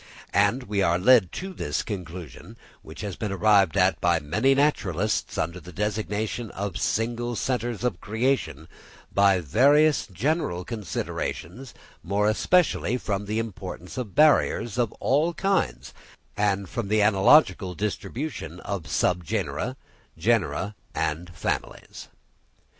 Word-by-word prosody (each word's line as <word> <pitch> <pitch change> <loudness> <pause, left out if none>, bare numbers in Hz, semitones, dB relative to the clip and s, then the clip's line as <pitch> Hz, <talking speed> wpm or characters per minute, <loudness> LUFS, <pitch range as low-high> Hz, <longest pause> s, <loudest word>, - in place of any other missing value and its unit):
And 105 +6 +3
we 100 -2 -1
are 85 -2 +3
led 105 -2 +5
to 190 +1 -5
this - - -2
conclusion, 90 - -8 0.2
which - - -10
has 100 -4 -4
been 105 -3 -4
arrived 100 -2 +3
at 95 -1 +3
by 85 -1 +3
many 105 - +2
naturalists 110 - 0
under 85 +3 -2
the 90 0 -12
designation 105 +3 -2
of 100 -2 -4
single 120 +2 -1
centres 120 0 -2
of 125 - -1
creation, 105 - -1 0.5
by 100 -1 +4
various 145 - +4
general 95 - -1
considerations, 115 - -5 0.3
more 100 +3 0
especially 125 - +2
from 100 -4 -3
the 105 +1 -2
importance 100 -5 -6
of 120 -6 -5
barriers 145 -6 +3
of 120 -4 +1
all 155 +6 +1
kinds, 195 -1 -1 0.4
and 100 -2 0
from 115 +3 -4
the 105 +1 +3
analogical 100 - +4
distribution 105 - -4
of 100 -5 -5
subgenera, 90 -2 -1 0.4
genera, 100 +3 0 0.2
and 80 +2 -2
families. - - -4
105 Hz, 125 wpm, -25 LUFS, 90-120 Hz, 0.5 s, led